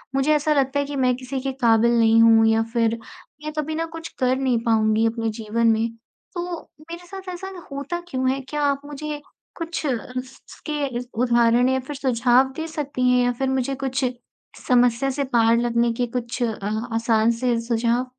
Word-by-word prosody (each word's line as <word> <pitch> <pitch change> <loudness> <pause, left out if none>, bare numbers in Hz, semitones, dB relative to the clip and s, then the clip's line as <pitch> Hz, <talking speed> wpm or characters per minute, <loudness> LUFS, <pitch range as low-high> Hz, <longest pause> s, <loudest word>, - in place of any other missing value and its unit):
मुझे 275 +3 +3
ऐसा 300 +1 +2
लगता 275 0 +1
है 285 - 0
कि 285 0 -6
मैं 255 -2 +2
किसी 260 +1 -5
के 270 0 -2
काबिल 235 +1 +4
नहीं 225 0 +5
हू, 225 -1 +6
या 225 0 +3
फिर 230 -1 +1 0.5
मैं 305 - -4
कभी 310 +1 -2
ना 330 +1 -1
कुछ 325 0 -7
कर 255 0 +2
नहीं 255 -3 +1
पाऊँगी 220 -1 +3
अपने 225 0 -1
जीवन 230 +2 0
में। 225 +1 +1 0.5
तो 350 -1 -3 0.3
मेरे 345 +1 -8
साथ 385 0 -8
ऐसा 385 +2 -7 0.2
होता 285 +5 -4
क्यों 260 0 0
है? 270 - -2
क्या 295 +3 -4
आप 280 -1 +1
मुझे 295 +1 -6 0.4
कुछ 330 -2 -4
इस 255 +1 -4
इसके 295 -2 -4
अ, 245 -1 -4
उदाहरण 240 +1 +3
या 260 0 +1
फिर 280 +3 -7
सुझाव 255 0 +3
दे 320 0 -3
सकतीं 280 -5 -1
हैं 250 0 +4
या 245 - +2
फिर 265 -1 +1
मुझे 265 +1 -1
कुछ 265 +1 0 0.6
समस्या 245 +1 +3
से 280 +1 -1
पार 230 -3 +3
लगने 235 0 +1
के 245 +2 -1
कुछ 240 +1 -4
अ, 220 0 -2
आसान 225 0 +2
से 235 0 0
सुझाव? 235 +1 0
255 Hz, 190 wpm, -23 LUFS, 230-280 Hz, 0.6 s, हू